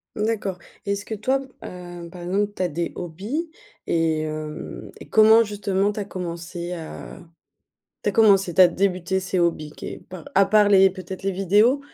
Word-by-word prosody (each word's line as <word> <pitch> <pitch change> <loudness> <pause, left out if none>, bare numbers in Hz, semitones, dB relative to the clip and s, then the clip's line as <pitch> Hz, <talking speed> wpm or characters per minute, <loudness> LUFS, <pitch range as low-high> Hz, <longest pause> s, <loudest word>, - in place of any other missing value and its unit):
D'accord, 210 -4 -2 0.3
et 200 - -1
est-ce 200 0 -3
que 220 - -4
toi, 260 +6 +1 0.2
heu, 175 -1 -8
par 180 - -10
exemple, 200 +4 -1
tu - - -5
as 180 - +2
des 170 +2 -3
hobbies 205 - -4 0.4
et 165 -2 +1
hem 155 0 -6
et - - -12
comment, 220 +1 +7
justement, 205 -1 0
tu 210 - -6
as 205 - -3
commencé 175 -1 -5
à 165 -1 -8 0.8
tu 205 - +1
as - - -9
commencé 195 -5 +4
tu 175 - +2
as 180 - +9
débuté 185 0 0
ces 185 0 -2
hobbies, 165 -3 0
que - - -7
par 180 -4 -8
à 195 - +6
part 210 +1 +4
les 195 -1 +6
peut-être, 185 0 -8
les 195 - 0
vidéos? 205 +8 +3
190 Hz, 185 wpm, -23 LUFS, 175-205 Hz, 0.8 s, as